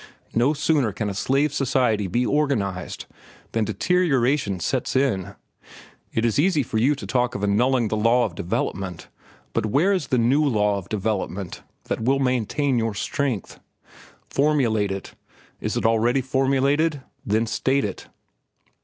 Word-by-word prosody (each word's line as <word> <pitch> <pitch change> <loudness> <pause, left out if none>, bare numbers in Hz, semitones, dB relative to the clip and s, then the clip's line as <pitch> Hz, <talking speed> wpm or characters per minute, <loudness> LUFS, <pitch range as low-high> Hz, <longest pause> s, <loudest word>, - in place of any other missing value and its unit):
No 120 +6 +3
sooner 145 -6 +1
can 105 +1 -3
a - - -5
slave 135 +8 +1
society 125 -7 +1
be 120 +7 0
organized 125 -12 -1 0.5
than 115 -1 0
deterioration 130 - +1
sets 130 +11 -2
in. 125 -9 0 0.8
It 115 - 0
is 115 +3 +1
easy 160 -2 +3
for 110 -2 -2
you 140 +6 +3
to 140 - -8
talk 125 -1 0
of 100 - -4
annulling 120 +3 +2
the 110 - 0
law 115 +3 +3
of 100 - -5
development, 90 -1 -3 0.4
but 110 - 0
where 160 - +3
is 180 -6 -1
the 130 - +1
new 125 +6 +3
law 105 -7 +2
of 95 - -13
development 100 -3 -3 0.2
that - - -3
will 130 +4 +2
maintain 130 +1 0
your 115 -2 -1
strength? 130 - -2 0.7
Formulate 125 -9 +1
it. 95 0 -6 0.5
Is - - -2
it - - -1
already 115 +4 +3
formulated? 135 +3 +1 0.2
Then 110 +3 +1
state 130 +4 0
it." - - -6
120 Hz, 150 wpm, -23 LUFS, 105-140 Hz, 0.8 s, No